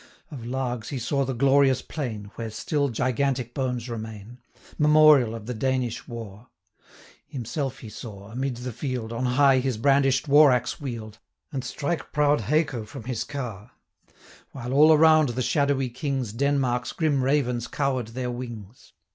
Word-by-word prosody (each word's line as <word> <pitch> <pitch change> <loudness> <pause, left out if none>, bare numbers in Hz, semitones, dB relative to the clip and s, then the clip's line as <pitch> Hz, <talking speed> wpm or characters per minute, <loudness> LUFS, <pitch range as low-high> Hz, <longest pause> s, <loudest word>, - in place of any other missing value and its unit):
Of 135 -6 -8
Largs 125 -1 -3
he 140 - -4
saw 135 +3 0
the 130 -1 -3
glorious 135 0 +3
plain, 110 -9 -5
Where 115 -1 -5
still 140 +6 -1
gigantic 125 +1 -1
bones 125 -3 -2
remain, 110 0 -7 0.4
Memorial 150 -6 +6
of 110 -2 -8
the 125 - -4
Danish 125 0 -2
war; 115 -1 -9 0.8
Himself 135 0 -4
he 115 - -8
saw, 100 -2 -10
amid 130 +1 -3
the 125 0 -6
field, 125 -2 -4
475 115 - -4
On 125 - -1
high 135 -2 +5
his 130 -3 -1
brandish'd 135 +2 +2
war 145 0 +7
axe 125 +3 -1
wield, 115 -6 -6 0.3
And 135 -4 -3
strike 145 +6 -3
proud 150 -2 +2
Haco 145 0 0
from 115 +3 -10
his 125 0 -3
car, 120 -7 -7 0.8
While 130 -1 -5
all 150 +3 +7
around 155 -2 +6
the 125 +2 -2
shadowy 140 -2 +1
Kings 130 -3 -3
Denmark's 125 -2 0
grim 150 -4 +1
ravens 125 -3 0
cower'd 130 -5 -1
their 125 +2 -4
wings. 120 -3 -9
130 Hz, 155 wpm, -25 LUFS, 115-140 Hz, 0.8 s, war